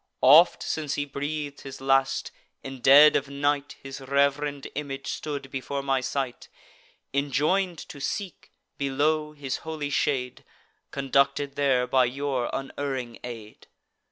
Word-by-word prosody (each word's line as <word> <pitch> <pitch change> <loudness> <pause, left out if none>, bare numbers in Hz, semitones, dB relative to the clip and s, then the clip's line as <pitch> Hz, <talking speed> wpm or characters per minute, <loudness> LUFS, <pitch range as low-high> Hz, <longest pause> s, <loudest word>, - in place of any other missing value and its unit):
Oft, 155 +7 +7
since 150 -3 -2
he 145 - -1
breath'd 145 +1 -4
his 135 -1 -9
last, 135 0 +1 0.3
in 135 -1 -7
dead 145 +4 +8
of - - 0
night 145 +1 -1
His 135 0 -8
reverend 140 +1 0
image 135 -1 -5
stood 140 -3 -5
before 140 +1 -4
my 135 -1 +1
sight; 130 -1 -3 0.6
Enjoin'd 150 +7 +1
to 145 - -10
seek, 190 +5 -5 0.3
below, 150 +3 0
his 140 -3 -4
holy 155 -3 -5
shade; 130 -3 -1 0.5
Conducted 140 +1 +1
there 135 -3 +2
by 130 0 +3
your 130 0 -2
unerring 135 -3 -4
aid. 115 -3 -9
140 Hz, 130 wpm, -26 LUFS, 135-145 Hz, 0.6 s, dead